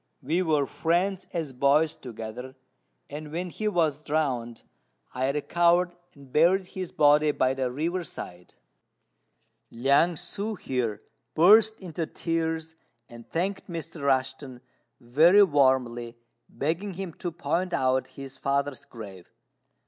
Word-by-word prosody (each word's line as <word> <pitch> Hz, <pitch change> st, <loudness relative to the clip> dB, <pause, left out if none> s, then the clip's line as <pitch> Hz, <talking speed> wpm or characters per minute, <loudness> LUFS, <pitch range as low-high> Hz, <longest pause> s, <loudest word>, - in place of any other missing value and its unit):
"We 160 Hz, +7 st, +1 dB
were 155 Hz, -5 st, +2 dB
friends 185 Hz, +5 st, -1 dB
as 160 Hz, -6 st, -3 dB
boys 140 Hz, +4 st, +3 dB
together; 125 Hz, +2 st, -8 dB, 0.5 s
and 150 Hz, +1 st, -8 dB
when 175 Hz, +2 st, -4 dB
he 215 Hz, -, -3 dB
was 160 Hz, -7 st, 0 dB
drowned, 130 Hz, -7 st, -2 dB, 0.5 s
I 130 Hz, +1 st, 0 dB
recovered 175 Hz, +4 st, +2 dB, 0.2 s
and 140 Hz, -2 st, -16 dB
buried 180 Hz, +5 st, +4 dB
his 185 Hz, -1 st, -6 dB
body 150 Hz, +1 st, +4 dB
by 130 Hz, -3 st, +1 dB
the 130 Hz, -1 st, -1 dB
river 165 Hz, +8 st, -2 dB
side." 90 Hz, -, -9 dB, 1.1 s
Liang 140 Hz, +8 st, +2 dB
ssŭ 205 Hz, +6 st, -4 dB
here 115 Hz, -8 st, -3 dB, 0.3 s
burst 215 Hz, +6 st, +6 dB
into 165 Hz, -3 st, -4 dB
tears, 160 Hz, -1 st, -2 dB, 0.4 s
and 120 Hz, -1 st, -13 dB
thanked 190 Hz, +4 st, -2 dB
Mr. 165 Hz, -2 st, -6 dB
Rushten 130 Hz, -1 st, -1 dB, 0.4 s
very 160 Hz, +11 st, +5 dB
warmly, 130 Hz, -7 st, +1 dB, 0.3 s
begging 170 Hz, +7 st, -3 dB
him 185 Hz, -2 st, -5 dB
to 175 Hz, -, -3 dB
point 175 Hz, +2 st, -2 dB
out 130 Hz, -3 st, +1 dB
his 135 Hz, -1 st, -10 dB
father's 140 Hz, -1 st, -1 dB
grave. 100 Hz, -6 st, -11 dB
150 Hz, 125 wpm, -27 LUFS, 130-175 Hz, 1.1 s, burst